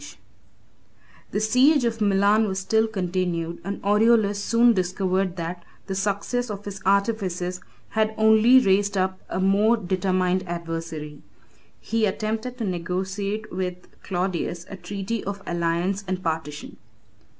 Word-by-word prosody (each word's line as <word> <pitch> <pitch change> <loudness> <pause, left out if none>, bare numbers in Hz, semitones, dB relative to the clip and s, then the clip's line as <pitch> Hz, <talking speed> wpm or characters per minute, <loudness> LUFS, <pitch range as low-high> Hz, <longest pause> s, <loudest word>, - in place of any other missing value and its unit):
] - - -31
The - - 0
siege 250 +6 +4
of 230 -1 -1
Milan 205 +2 +3
was 190 -1 -2
still 220 +3 +2
continued, 180 -4 -2
and 200 +2 -4
Aureolus 205 0 +3
soon 235 +1 +4
discovered 185 -1 0
that 170 0 -5 0.2
the 195 - -4
success 205 +5 -1
of 205 -1 -6
his 200 -1 -7
artifices 190 -3 0 0.3
had 220 0 0
only 220 +3 +6
raised 200 -3 +3
up 185 0 0
a - - -2
more 205 +5 +3
determined 185 -1 0
adversary. 165 -3 -5 0.6
He 225 -1 0
attempted 220 +5 -3
to 235 - -3
negotiate 195 +3 -3
with 180 -1 -2 0.3
Claudius 180 -2 -2
a - - -5
treaty 195 +4 -4
of 200 0 -5
alliance 175 +3 -1
and 185 0 -3
partition. 155 -3 -4
195 Hz, 130 wpm, -24 LUFS, 180-215 Hz, 0.6 s, only